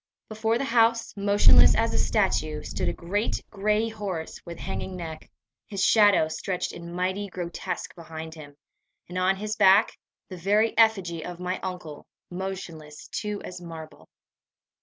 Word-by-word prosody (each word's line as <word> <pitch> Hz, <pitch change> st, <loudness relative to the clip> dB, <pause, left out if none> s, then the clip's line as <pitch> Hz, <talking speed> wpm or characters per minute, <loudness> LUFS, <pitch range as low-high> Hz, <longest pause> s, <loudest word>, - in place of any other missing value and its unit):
Before 220 Hz, +1 st, 0 dB
the 260 Hz, -, -2 dB
house, 230 Hz, -1 st, +3 dB
motionless 110 Hz, -, +6 dB
as -, -, +1 dB
a -, -, +1 dB
statue, 155 Hz, -1 st, +1 dB
stood -, -, -2 dB
a -, -, -1 dB
great 205 Hz, +6 st, -1 dB
gray 210 Hz, +2 st, +1 dB
horse 200 Hz, -7 st, -5 dB
with 170 Hz, -1 st, -8 dB
hanging 190 Hz, -, -5 dB
neck, 160 Hz, -3 st, -7 dB, 0.4 s
his 195 Hz, -2 st, -2 dB
shadow 205 Hz, -7 st, +5 dB
stretched 180 Hz, +3 st, -3 dB
in 170 Hz, 0 st, -8 dB
mighty 185 Hz, +3 st, -1 dB
grotesque 175 Hz, -2 st, -5 dB
behind 160 Hz, -1 st, -8 dB
him, 145 Hz, -3 st, -12 dB, 0.5 s
and 180 Hz, +1 st, -4 dB
on 185 Hz, +1 st, +3 dB
his 210 Hz, +2 st, -3 dB
back 195 Hz, +1 st, +5 dB, 0.3 s
the 185 Hz, -, -8 dB
very 210 Hz, +5 st, +2 dB
effigy 195 Hz, -8 st, +3 dB
of 175 Hz, -1 st, -7 dB
my 180 Hz, +1 st, -2 dB
uncle, 180 Hz, -5 st, -7 dB, 0.2 s
motionless 175 Hz, -5 st, -6 dB
too 210 Hz, -1 st, -4 dB
as 180 Hz, -1 st, -8 dB
marble. 160 Hz, -2 st, -10 dB
185 Hz, 150 wpm, -26 LUFS, 165-205 Hz, 0.5 s, motionless